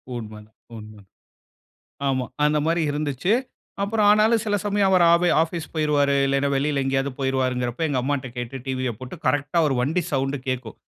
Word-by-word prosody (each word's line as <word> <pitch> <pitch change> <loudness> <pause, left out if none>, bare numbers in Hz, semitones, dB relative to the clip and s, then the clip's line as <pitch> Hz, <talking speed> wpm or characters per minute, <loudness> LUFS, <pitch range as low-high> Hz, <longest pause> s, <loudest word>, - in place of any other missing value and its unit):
உண்ம, 110 -2 -6 0.4
உண்ம. 105 -1 -12 1.1
ஆமா, 130 -2 0 0.2
அந்தமாரி 150 +3 +2
இருந்துச்சு. 145 - -1 0.5
அப்புறம் 210 +1 +1
ஆனாலும் 215 +1 +4
சில 205 -1 +1
சமயம் 205 -1 +2
அவரு 180 -2 +5
ஆப் 170 +1 +3 0.2
ஆபீஸு 165 0 -3
போயிருவாரு, 145 -2 +2
இல்லனா 140 +1 +1
வெளியில 140 0 0
எங்கயாவது 135 +1 0
போயிருவாருங்கறப்ப 130 +1 -1
எங்க 130 -3 0
அம்மா 140 +3 0
கிட்ட 130 -1 -8
கேட்டு 120 +2 -5
டிவிய 130 -2 -1
போட்டு 130 +6 -8
கரெக்டா 145 +3 0
அவுரு 150 -4 +1
வண்டி 160 +8 0
சவுண்டு 135 0 0
கேக்கும். 125 -4 -4
140 Hz, 155 wpm, -23 LUFS, 130-165 Hz, 1.1 s, அவரு